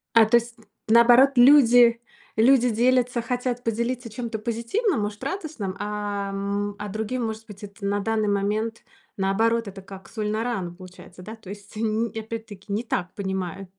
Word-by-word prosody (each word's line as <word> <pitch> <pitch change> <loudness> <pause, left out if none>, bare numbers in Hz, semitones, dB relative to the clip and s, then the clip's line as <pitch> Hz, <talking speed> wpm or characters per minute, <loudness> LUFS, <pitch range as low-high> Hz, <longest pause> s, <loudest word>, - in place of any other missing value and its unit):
А, 225 -1 +7
то 230 - +4
есть, 235 0 -1 0.3
наоборот, 240 +4 +7
люди 245 -3 +6 0.4
люди 245 +2 +5
делятся, 245 +1 +2
хотят 245 +1 -2
поделиться 235 +2 -2
чем-то 230 0 -5
позитивным, 235 - -1
может, 205 0 -5
радостным. 295 - -4
А, 205 -1 -3
м, 200 +1 -2
а 210 0 -5
другим, 220 +4 -3
может 220 0 -6
быть, 210 -1 -12
это 200 0 -10
на 200 +1 0
данный 215 0 0
момент, 210 +3 -1 0.3
наоборот, 225 +3 +1
это 195 0 -9
как 190 -1 -12
соль 215 -2 -3
на 220 +1 -1
рану, 195 -8 -3
получается, 185 0 -13
да. 215 +4 -8
То 220 -4 -13
есть 205 +1 -11
ни 225 +1 -1
опять-таки, 220 -2 -7
не 220 +4 -1
так 180 -5 -3
понимаю. 190 -1 -4
220 Hz, 165 wpm, -24 LUFS, 200-235 Hz, 0.4 s, А